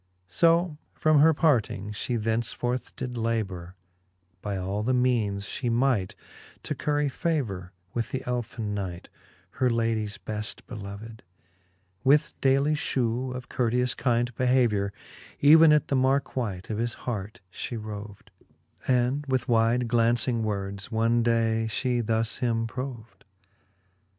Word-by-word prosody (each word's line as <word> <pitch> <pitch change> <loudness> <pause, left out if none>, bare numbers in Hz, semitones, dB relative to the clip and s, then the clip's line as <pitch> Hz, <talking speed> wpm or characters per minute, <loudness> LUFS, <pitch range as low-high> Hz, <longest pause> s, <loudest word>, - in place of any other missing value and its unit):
So 165 - +3 0.2
from 155 -2 +4
her 160 +3 +7
parting, 120 - +1
fhe 115 +3 -2
thenceforth 115 +3 -2
did 125 -1 -5
labour 95 -6 -2 0.7
By 100 -2 -3
all 95 +3 -2
the 125 +4 +1
meanes 110 -6 +1
fhe 120 +3 -2
might, 120 -6 +1 0.5
to - - -2
curry 145 0 0
favour 125 - -2 0.2
With 115 -1 -1
th'elfin 125 -4 -3
knight, 95 -4 -5 0.5
her 130 - +3
ladies 115 -3 0
beft 110 0 -4
beloved; 105 +2 -8 0.8
With 150 +3 +4
daily 135 +3 +3
fhew 130 -3 -1
of 125 0 -7
courteous 125 0 +1
kind 120 -1 0
behaviour, 120 -5 +2 0.5
Even 160 +2 +8
at 150 -1 +3
the 140 - +2
markewhite 130 -7 0
of 105 - -2
his 120 0 -1
hart 110 -1 -4
fhe 120 - -5
roved, 105 -1 -8 0.6
And 130 +3 +2
with 130 -2 0
wide 115 +1 +3
glauncing 115 0 +2
words, 100 -1 -3
one 115 +1 +2
day 115 -1 +1
fhe 120 +2 0
thus 110 0 -1
him 115 -2 0
proved: 115 -5 -7
XXXVI. 95 -1 -41
115 Hz, 130 wpm, -27 LUFS, 105-130 Hz, 0.8 s, Even